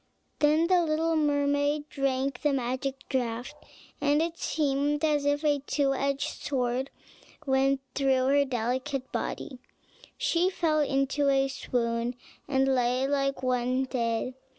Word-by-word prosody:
Then 305 +2 +4
the 360 0 +4
little 325 +1 +1
mermaid 290 0 +1
drank 270 -2 -1
the 295 -2 +2
magic 265 +1 -3
draught, 245 -1 -2 0.5
and 290 +1 +3
it 335 +1 -2
seemed 290 0 0
as 295 -2 +1
if 290 +1 +1
a 295 -2 +2
two 275 0 0
edged 275 +1 -2
sword 255 0 -1 0.6
went 270 0 +2
through 265 -2 +2
her 285 +1 +4
delicate 255 +1 -2
body: 260 -3 -4 0.6
she 350 +2 +2
fell 325 -5 +1
into 275 0 +1
a 270 0 +3
swoon, 240 -2 -2 0.3
and 270 -1 +2
lay 250 +1 +1
like 275 -1 0
one 255 +1 +1
dead. 235 -1 -1
275 Hz, 130 wpm, -28 LUFS, 260-290 Hz, 0.6 s, Then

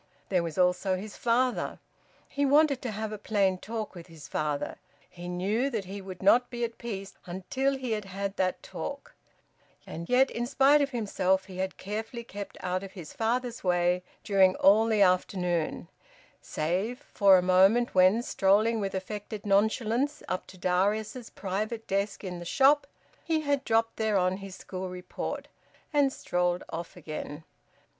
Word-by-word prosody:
There 185 -3 +2
was 165 -2 -5
also 180 +1 +2
his 205 +2 -8
father. 245 +1 +1 0.5
He 285 - -2
wanted 285 -1 +4
to 250 - -3
have 215 0 -4
a 215 - -6
plain 195 -3 +1
talk 220 +1 -5
with 175 -1 -10
his 160 -4 -12
father 150 -2 -2 0.3
he 175 0 -10
knew 200 +9 0
that 220 -7 -3
he 195 +2 -7
would 190 -1 -9
not 245 +5 +5
be 240 -1 -4
at 230 -1 -3
peace 195 -5 -6
until 260 +10 -1
he 255 -3 -4
had 210 -2 -1
had 195 +1 -4
that 185 -1 0
talk 285 - -6 0.7
and 170 +1 -7
yet 260 +2 +4
in 240 +1 -2
spite 280 +2 +5
of 285 - +1
himself 190 -6 0
he 185 -1 -10
had 190 0 -2
carefully 220 +4 -5
kept 205 -3 -8
out 185 0 -1
of 195 -1 -9
his 175 -6 -9
father's 240 +1 -1
way 180 0 +2 0.2
during 190 -2 +4
all 215 +3 +5
the 215 -3 +4
afternoon, 180 -3 0 0.5
save 185 +10 -2 0.2
for 195 -2 +7
a 180 - +1
moment 190 +6 +4
when, 185 +5 +5
strolling 215 +2 +3
with 195 -2 -2
affected 205 +2 -5
nonchalance 220 +7 +1
up 185 - -3
to 185 - -13
Darius's 210 +6 0
private 215 +4 -3
desk 200 +1 -1
in 180 -2 -5
the - - -7
shop, 275 +10 +4 0.4
he 320 -1 0
had 285 -2 0
dropped 225 -1 +1
thereon 195 -4 +1
his 195 -1 -9
school 185 0 -6
report, 180 0 -5 0.5
and 285 -2 +4
strolled 180 -6 -1
off 170 +2 -6
again. 155 -1 -6
200 Hz, 165 wpm, -28 LUFS, 185-235 Hz, 0.7 s, for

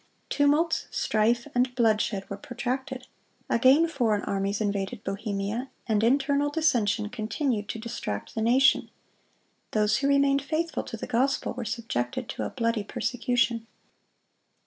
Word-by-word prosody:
Tumults, 295 +3 +2
strife, 230 +2 +1
and 250 0 +1
bloodshed 215 -4 +1
were 200 - -5
protracted. 255 +4 -4 0.5
Again 265 +7 +5
foreign 235 -10 0
armies 200 +1 -1
invaded 200 +1 -2
Bohemia, 205 +4 -3 0.2
and 220 -2 +1
internal 280 +4 +2
dissension 235 -9 +1
continued 220 0 -2
to - - -3
distract 220 - -5
the 220 - -2
nation. 255 +4 +4 0.8
Those 210 -1 +3
who 275 - 0
remained 280 0 +3
faithful 315 +4 -1
to 225 - -6
the - - -5
gospel 260 +3 0
were 245 -1 -5
subjected 210 - -3
to - - -4
a - - -2
bloody 230 -3 -1
persecution. 235 0 -1
235 Hz, 130 wpm, -27 LUFS, 215-270 Hz, 0.8 s, Again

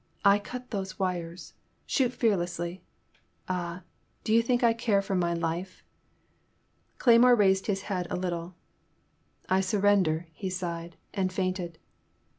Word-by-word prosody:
I 200 +1 +6
cut 250 +4 -8
those 190 -3 -4
wires! 180 -2 -3 0.3
Shoot 255 -4 +1
fearlessly 175 -7 -1 0.3
— - - -38
^Ah, 180 -1 -3 0.4
do 215 - 0
you 230 - +6
think 245 +1 +1
I 230 -1 +5
care 225 -3 +1
for 195 0 -3
my 175 -2 +1
life?'' 170 +3 -3 1.1
Cleymore 240 0 +6
raised 190 -2 +3
his 195 -2 -1
head 180 -4 -2
a - - -2
little. 175 -1 -3 0.9
I 190 +1 +3
surrender,'* 190 -4 +2
he 190 +4 -5
sighed, 170 -2 -4 0.2
and 185 -1 0
fainted. 185 -2 -2
185 Hz, 135 wpm, -28 LUFS, 175-205 Hz, 1.1 s, I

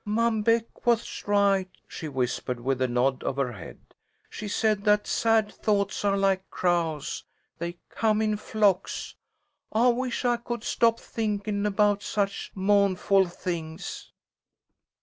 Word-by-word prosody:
"Mom 220 +1 +1
Beck 230 +2 0
was 235 -3 0
right," 200 -2 +3 0.2
she 160 - -6
whispered 125 -2 -2
with 130 +1 -1
a 130 - +3
nod 125 +2 +1
of 135 - -1
her 135 -3 -1
head. 100 -8 -10 0.5
"She 210 - -6
said 210 0 +1
that 210 0 +4
sad 225 -2 +2
thoughts 200 -2 0
are 200 -1 +2
like 195 -1 +1
crows. 170 -4 -1 0.4
They 170 +1 -4
come 215 -1 +1
in 215 -1 +1
flocks. 205 -3 0 0.6
I 235 +3 +4
wish 250 +1 -1
I 240 -1 +3
could 235 -1 -5
stop 230 -1 +2
thinkin' 210 -2 -2
about 205 0 +2
such 200 -1 -2
mou'nful 195 -1 +3
things." 165 -3 -5
205 Hz, 135 wpm, -27 LUFS, 175-220 Hz, 0.6 s, that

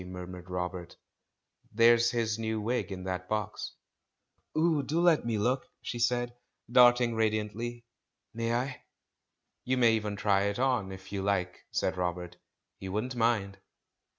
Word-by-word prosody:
murmured 90 0 -8
Robert; 90 -1 -4 0.7
"there's 115 +1 +5
his 115 -2 -1
new 110 -1 -1
wig 105 -2 -1
in 95 -1 -5
that 90 -1 -4
box." 105 -2 -3 0.8
"Oh, 160 -2 +3
do 150 +4 -1
let 170 -7 +4
me 115 -2 0
look!" 125 +5 0
she 120 - -5
said, 120 0 +1 0.4
darting 120 -1 +6
radiant 110 -1 0
ly. 120 +1 -5 0.5
"May 115 0 -1
I?" 125 +2 -2 0.8
"You 130 +1 0
may 120 -2 +5
even 105 -2 -1
try 100 -1 +2
it 100 0 -1
on, 125 -7 +1
if 95 0 -10
you 100 -1 -2
like," 95 -3 -1
said - - -1
Robert; 90 -1 -3 0.4
"he 95 - -6
wouldn't 110 +6 -2
mind." 110 -4 +1
110 Hz, 150 wpm, -30 LUFS, 95-120 Hz, 0.8 s, darting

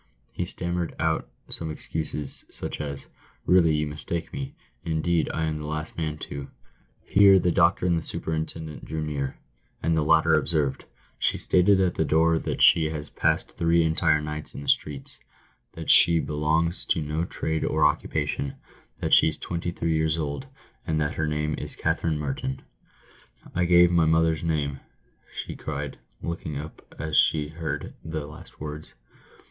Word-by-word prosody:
He 90 - -3
stammered 85 -1 -1
out 80 0 0 0.2
some 80 - -2
excuses, 75 -2 -2
such - - -5
as, 70 -2 -5 0.2
" - - -32
Really, 85 -4 +5
you 75 0 0
mistake 75 +3 -4
me. 140 0 -5 0.3
Indeed, 85 0 0
I 80 - -2
am 80 -1 -2
the 75 - -6
last 75 +1 -4
man 80 -2 -3
to 70 -1 -6 0.3
" - - -37
Here 100 -1 +8
the 90 -1 +2
doctor 85 +2 +3
and 90 -1 +3
the - - -7
superintendent 80 -1 -3
drew 80 0 -4
near, 70 -3 -3 0.5
and 80 - +2
the 80 - +2
latter 80 +1 +4
observed, 75 -3 +1 0.3
"She - - +4
stated 95 +2 +4
at 95 -2 +2
the - - +1
door 80 +1 +3
that - - -1
she 80 - +6
has 75 -1 -4
passed - - +1
three 85 0 +3
entire 80 -1 +3
nights 75 0 -3
in - - -6
the - - -10
streets 70 -3 0 0.3
— - - -40
that - - 0
she 85 -1 +6
belongs 80 +4 0
to 90 - +2
no 75 +2 -2
trade 80 -2 -2
or 80 -1 +2
occupation 75 -2 0 0.2
— - - -32
that - - 0
she's 80 -1 +6
twenty 85 0 -3
three 85 -1 -1
years 80 0 +1
old, 75 - -3 0.4
and 80 -2 +1
that 75 -1 0
her 75 - -1
name 75 0 -1
is - - -4
Katherine 80 -2 0
Merton." 65 -2 -3 0.9
"I 90 - +1
gave 90 0 +6
my 85 -2 +4
mother's 80 0 +2
name," 75 -4 -1 0.5
she - - -4
cried, 70 -1 -5 0.2
looking 85 -3 -4
up 75 +2 -9
as. 80 0 -1
she 75 -2 +4
heard 80 -2 -4
the 80 -2 -4
last 75 +1 -12
words. 75 0 -7
80 Hz, 175 wpm, -26 LUFS, 75-85 Hz, 0.9 s, Here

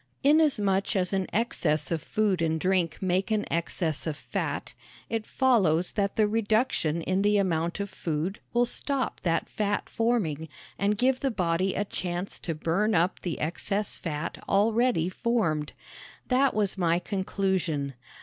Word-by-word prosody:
Inasmuch 250 -12 +3
as 185 0 +1
an 190 -1 0
excess 155 - 0
of 165 -2 0
food 200 -1 0
and 160 -1 +1
drink 180 -1 0
make 185 +2 +1
an 215 -1 +1
excess 165 -2 -1
of 150 -2 -2
fat, - - -4 0.4
it 225 -1 -2
follows 190 - +3
that 200 -1 -1
the 215 -1 +3
reduction 215 -7 +1
in 185 +3 +1
the 205 +1 +3
amount 170 -2 0
of 200 - -2
food 175 0 -3
will 240 0 +3
stop 275 +2 -2
that 165 -2 0
fat 205 -1 -1
forming 180 -10 0 0.3
and 205 +1 +1
give 255 +3 +2
the 275 - 0
body 185 -3 0
a 205 - 0
chance 180 -1 -4
to 165 - -3
burn 185 +8 +1
up 175 +3 +1
the 175 -3 -3
excess 195 +6 -1
fat 150 -2 -4
already 220 -2 +3
formed. 185 -8 0 0.6
That 265 0 +3
was 205 -2 +1
my 170 -1 +3
conclusion. 185 -6 -1
190 Hz, 150 wpm, -27 LUFS, 165-215 Hz, 0.6 s, Inasmuch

